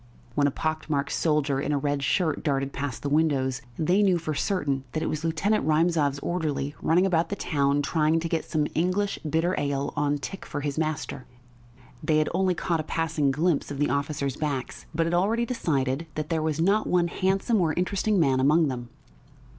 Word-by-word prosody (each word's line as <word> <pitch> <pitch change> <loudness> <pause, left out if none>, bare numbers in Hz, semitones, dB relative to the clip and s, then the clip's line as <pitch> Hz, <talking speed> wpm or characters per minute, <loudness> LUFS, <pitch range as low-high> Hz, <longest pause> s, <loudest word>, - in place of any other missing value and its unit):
When 145 +2 +3
a - - +3
pock 155 +3 -3
marked 140 -2 0
soldier 150 -4 +1
in 145 - -1
a 145 - +2
red 145 0 -1
shirt 155 +1 0
darted 140 -2 0
past 140 -3 -4
the - - -1
windows, 140 -4 +1 0.2
they 180 +6 +2
knew 190 -3 +4
for 160 -2 -3
certain 140 -4 -1
that 155 - -1
it - - -1
was 155 +1 -3
Lieutenant 165 +7 +1
Rymzov's 155 -2 +2
orderly 150 -5 -2
running 175 +4 +3
about 170 -3 +1
the 200 - -2
town, 145 -4 +1
trying 160 +1 +2
to 165 - -3
get 165 -1 -1
some 155 -2 +1
English 185 +4 0
bitter 160 +3 0
ale 140 -1 -1
on 145 0 +1
tick 190 +7 -7
for 145 - -5
his 145 +1 -2
master. 155 -4 -3 0.7
They 155 0 +2
had 155 - +2
only 185 0 +2
caught 170 -1 -1
a - - -1
passing 160 -2 0
glimpse 155 +3 +1
of 145 - -5
the 145 -2 +1
officers' 140 -1 -1
backs, 140 -4 -3
but 165 +1 0
had 165 - -1
already 215 +7 +2
decided 155 - -1
that 155 0 -3
there 165 -2 0
was 155 -1 -1
not 200 +6 +2
one 175 -1 +2
handsome 190 +5 +1
or 160 -2 +2
interesting 195 +3 +1
man 135 -5 +3
among 150 +3 +4
them.... 120 -2 -5
155 Hz, 200 wpm, -26 LUFS, 145-170 Hz, 0.7 s, knew